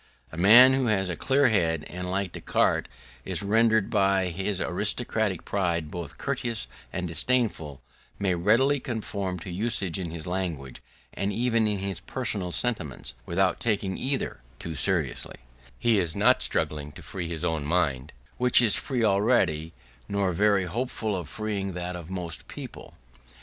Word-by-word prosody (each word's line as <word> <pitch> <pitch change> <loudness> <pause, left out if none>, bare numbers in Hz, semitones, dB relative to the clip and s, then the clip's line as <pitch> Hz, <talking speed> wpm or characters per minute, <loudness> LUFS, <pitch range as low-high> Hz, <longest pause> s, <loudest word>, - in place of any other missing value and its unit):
A - - -9
man 115 +9 +8
who 130 -2 +1
has 95 -4 +1
a 85 - -2
clear 135 - +3
head, 80 -7 +1
and 90 0 -6
like 95 -1 -1
Descartes - - 0 0.3
is - - -2
rendered 110 +1 +3
by 95 -3 +2
his 95 +2 -2
aristocratic 105 0 -1
pride 85 -6 -1
both 85 -5 -7
courteous 120 -5 -2 0.2
and 90 0 -3
disdainful, 80 - 0 0.3
may 95 -2 +1
readily 115 +11 +3
conform 100 -6 -3
to 90 - -7
usage 100 -2 -1
in 90 -3 -3
his 80 -1 -4
language, 85 -8 -4 0.3
and 100 +1 -2
even 115 0 +1
in 105 -1 0
his 95 -3 -4
personal 100 -4 -3
sentiments, 85 - -1
without 95 +2 +1
taking 100 -4 0
either 135 +1 -2 0.2
too 85 - -6
seriously: 80 -4 0 0.4
he 110 - +3
is 85 -4 -1
not - - +4
struggling 75 -1 -2
to - - -12
free 90 -4 -5
his 85 0 -4
own 80 -3 -1
mind, 75 -4 0 0.3
which 125 0 +5
is 115 -5 +5
free 125 -4 -1
already, 100 -7 +2 0.4
nor 100 -2 +1
very 100 +1 +2
hopeful 110 +1 -2
of 85 -5 -5
freeing 100 0 -3
that 90 +1 -4
of 85 -1 -8
most 90 -3 -4
people. - - -9
95 Hz, 155 wpm, -26 LUFS, 85-110 Hz, 0.4 s, man